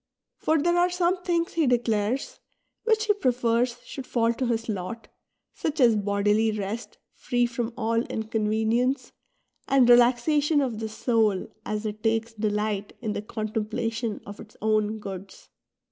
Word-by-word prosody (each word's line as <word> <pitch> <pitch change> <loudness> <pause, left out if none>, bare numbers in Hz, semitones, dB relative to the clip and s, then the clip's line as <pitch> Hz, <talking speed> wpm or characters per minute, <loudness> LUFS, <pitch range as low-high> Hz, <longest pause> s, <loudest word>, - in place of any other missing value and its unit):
For 315 - +2
there 345 +3 +2
are 355 +1 +4
some 360 +1 +1
things, 340 -2 0
he 320 -4 +2
declai'es, 240 - 0 0.5
which 440 -1 +3
he 420 - +4
prefers 245 - +1
should 270 -2 -8
fall 230 -1 +2
to 255 +1 -2
his 230 -1 -1
lot, 215 +2 -5 0.4
such 310 0 -3
as 235 -4 +6
bodily 205 +2 +2
rest 210 +2 -5 0.2
free 245 -1 0
from 240 -1 -3
all 230 0 +1
inconvenience, 220 +4 0 0.6
and 265 -3 +5
relaxation 255 +5 +4
of 250 -6 -1
the 220 -1 -3
soul 220 -4 +1 0.2
as 215 +1 -2
it 210 0 -4
takes 225 +1 0
delight 210 -1 -2
in 220 -4 -3
the - - -3
con 215 0 -4
templation 225 +1 -2
of 205 0 -9
its 215 - -13
own 215 0 +1
goods. 195 -2 -9
230 Hz, 150 wpm, -26 LUFS, 215-255 Hz, 0.6 s, as